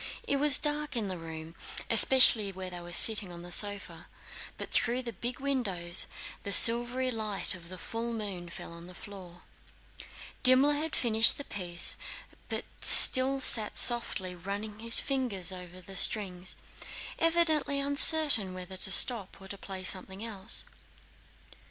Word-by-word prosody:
It 280 - -2
was 290 0 +4
dark 295 -1 -4
in 215 -4 -4
the 185 - -7
room 160 0 -12 0.3
especially 230 -6 +5
where 185 -1 -9
they 175 - -9
were 175 0 -12
sitting 205 +1 +2
on 170 0 -13
the 175 - -11
sofa, 205 +1 0 0.5
but - - -10
through 245 +2 -3
the 235 -2 -9
big 240 +7 -8
windows 200 -11 -2 0.3
the 200 - -7
silvery 240 +4 +4
light 215 -4 -3
of 170 -2 -14
the 185 - -11
full 230 +6 -7
moon 200 -6 -9
fell 170 - -11
on 170 +1 -13
the 180 - -15
floor. 180 -4 -14 1.0
Dimmler 260 +3 +3
had 300 +1 -4
finished 225 -2 +1
the 285 - -9
piece 175 -8 -5 0.5
but - - -4
still 265 +1 +4
sat 220 -5 +3
softly 235 -6 +1
running 200 +4 -9
his 230 +1 +5
fingers 235 -10 -3
over 180 -1 -11
the 195 +2 -12
strings, 185 -2 +1 0.6
evidently 325 -4 -1
uncertain 280 - +3
whether 185 +1 -10
to 190 - +3
stop 205 -1 +3
or 195 - -14
to 200 - -6
play 190 -1 -10
something 190 +3 -4
else. 215 -1 -2
205 Hz, 150 wpm, -27 LUFS, 185-255 Hz, 1.0 s, especially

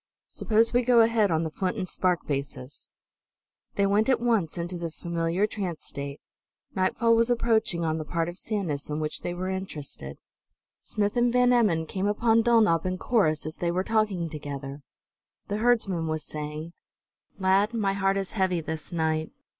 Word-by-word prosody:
Suppose 225 +1 +2
we 245 - +4
go 240 -1 +5
ahead 225 -2 +3
on 160 -1 +1
the 160 - -3
flint 185 +6 -2
and 185 -3 -3
spark 180 -3 0
basis." 140 -2 -5 0.9
They 200 - +2
went 205 +4 +2
at 260 - +3
once 225 -10 0
into 175 +1 -3
the 170 -1 -3
familiar 170 +3 -1
trance 190 -6 -4
state. 140 0 -6 0.5
Nightfall 230 +5 +2
was 230 +1 +3
approaching 225 -7 +1
on 160 0 0
the - - -3
part 165 +2 -1
of 175 +2 -6
Sanus 180 -11 -3
in 150 +1 -2
which 155 0 -3
they 175 - -3
were 185 +1 -3
interested. 160 - -6 0.6
Smith 205 +1 -1
and 240 0 +3
Van 250 0 +4
Emmon 195 -10 +3
came 190 +4 -2
upon 225 +2 +3
Dulnop 220 -8 +4
and 185 0 -2
Corrus 155 -12 +1
as 155 - -6
they 175 - -1
were 180 +2 0
talking 210 -5 0
together. 145 -2 -7 0.7
The 205 - -1
herdsman 210 -8 +1
was 155 -1 -2
saying: 150 +2 -6 0.6
"Lad, 195 +3 +3
my 200 -3 +1
heart 195 0 +1
is 195 -1 -3
heavy 185 -4 +1
this 160 +1 -6
night." 160 -2 0
185 Hz, 175 wpm, -27 LUFS, 160-215 Hz, 0.9 s, go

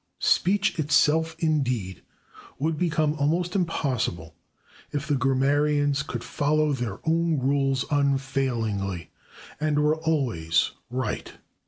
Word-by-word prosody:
Speech 195 0 +2
itself, 155 +2 +3
indeed, 130 - -1 0.6
would 160 +4 0
become 155 -2 +1
almost 170 +5 0
impossible 125 - -1 0.6
if 145 0 -3
the 150 - +1
grammarians 140 +2 +2
could 125 -5 -5
follow 150 +1 +1
their 120 -7 -3
own 165 0 +2
rules 135 0 +1
unfailingly, 130 - -1 0.5
and 150 -1 0
were 150 +1 +2
always 130 - 0 0.2
right. 130 +2 -3
145 Hz, 105 wpm, -25 LUFS, 130-155 Hz, 0.6 s, itself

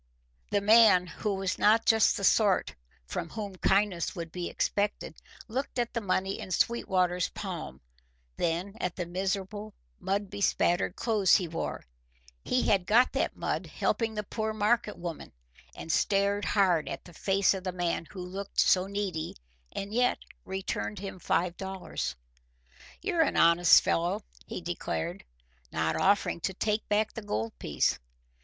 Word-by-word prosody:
The 205 - +1
man, 210 -3 +6
who 200 +3 -3
was 190 -1 -2
not 220 +2 +4
just 220 -1 +4
the 200 - -5
sort 200 0 +3 0.3
from 165 - -4
whom 205 -4 -6
kindness 195 -1 +1
would 170 -2 -6
be 175 0 -4
expected, 205 0 -2 0.3
looked 255 +4 -4
at 240 -1 -1
the 230 - -1
money 195 -1 -1
in - - -7
Sweetwater's 180 -3 +1
palm, 65 +1 -6 0.5
then 175 +4 -1
at 180 - -2
the 180 - -3
miserable, 195 +4 -3 0.2
mud 200 0 -2
bespattered 190 -3 +1
clothes 215 -5 +3
he 185 -4 +1
wore 165 - -4 0.6
(he 250 - +1
had 195 -4 +2
got 240 +4 +5
that - - 0
mud - - -2
helping 225 -2 -1
the 210 - -2
poor 220 +1 -3
market 215 +1 +1
woman), 170 -2 -7 0.4
and 165 - -5
stared 200 +3 +2
hard 180 -6 +2
at - - -6
the 175 - -13
face 195 +4 +2
of 190 -1 -5
the 185 - -2
man 175 -2 -2
who 180 +1 -8
looked 195 +2 -5
so 185 0 +4
needy 195 -5 -3 0.4
and 200 +1 -5
yet 245 +1 +2 0.3
returned 190 +2 -3
him 195 -1 -7
five 175 0 0
dollars. 190 -1 -4 0.9
"You're 350 -4 +1
an 310 - +1
honest 170 +1 +6
fellow," 170 +1 0 0.2
he - - -5
declared, 80 -5 -4 0.5
not 80 0 0
offering 200 - +2
to 190 +2 -3
take 215 +2 -1
back 210 +1 +1
the 225 - -6
gold 110 - -2
piece. - - 0
195 Hz, 155 wpm, -29 LUFS, 180-210 Hz, 0.9 s, man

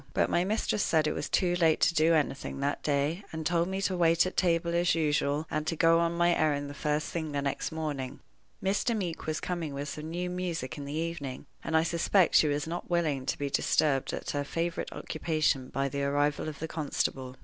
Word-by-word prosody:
But - - +2
my 175 - +3
mistress 210 +1 0
said 160 -4 +2
it 155 - +1
was - - -4
too 175 -1 +2
late 165 -3 +3
to 170 - +4
do 165 +1 +4
anything 140 -3 -1
that 140 +1 -1
day, 150 +6 0
and 160 -1 -5
told 170 +1 +2
me 190 +1 -3
to 190 - +1
wait 170 -1 +4
at 185 - -4
table 170 -1 +1
as 175 +1 +3
usual, 150 -1 +1
and 155 0 -2
to 165 - 0
go 165 +1 +5
on 170 0 0
my 175 0 +4
errand 145 -2 0
the - - -7
first 150 +1 -1
thing 160 -3 -3
the 140 - 0
next 140 - -2
morning. 150 -5 -4 0.4
Mr. 205 +4 +1
Meeke 175 -6 -4
was 155 0 -1
coming 165 -5 -3
with 140 +1 -4
some 155 +2 -6
new 175 +2 -2
music 175 -8 -3
in 145 - -7
the 140 - -5
evening, 155 -5 -4 0.2
and 160 - +1
I 160 - +4
suspect 170 +2 +2
she 155 - +6
was 145 -1 0
not 170 +2 -5
willing 155 -7 0
to - - 0
be 140 -1 -3
disturbed 135 -2 +2
at - - -4
her 145 0 -1
favorite 165 +3 -3
occupation 155 -5 -1
by 135 0 -1
the 140 +1 -3
arrival 145 +2 +1
of 150 - -8
the 160 - -4
constable. 135 -4 -2
160 Hz, 225 wpm, -29 LUFS, 145-170 Hz, 0.4 s, she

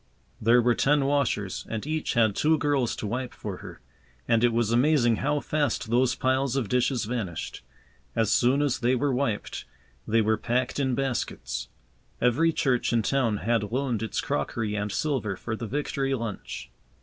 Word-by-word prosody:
There 120 +2 +5
were 120 0 +4
ten 145 +3 +2
washers, 135 -9 0
and 110 +1 -4
each 155 -2 -2
had 110 -4 +3
two 155 +1 +3
girls 145 -5 +1
to - - -5
wipe 125 +4 -3
for - - -6
her, - - -11 0.5
and 115 0 +3
it 120 - +5
was 115 -1 +1
amazing 120 -2 +3
how 145 +1 0
fast 130 -7 -1
those 125 +1 +3
piles 130 0 +1
of 130 -6 0
dishes 125 -1 +1
vanished. 105 -8 -4 0.5
As 110 -2 +2
soon 130 +4 +3
as 140 -4 0
they 125 +1 +2
were 140 +2 +1
wiped, 125 -5 -2 0.4
they 115 +1 +3
were 110 0 +2
packed 125 +5 -1
in 130 -3 +1
baskets. 135 -2 -3 0.5
Every 135 +8 +3
church 130 -7 +1
in 115 -2 +2
town 120 -4 +1
had 115 -3 +1
loaned 125 -3 -1
its 110 - -2
crockery 105 +9 -2
and 105 0 -2
silver 125 -7 -1
for 110 +4 -4
the 115 0 -5
Victory 135 0 -1
lunch. 115 -4 -6
125 Hz, 175 wpm, -27 LUFS, 115-135 Hz, 0.5 s, There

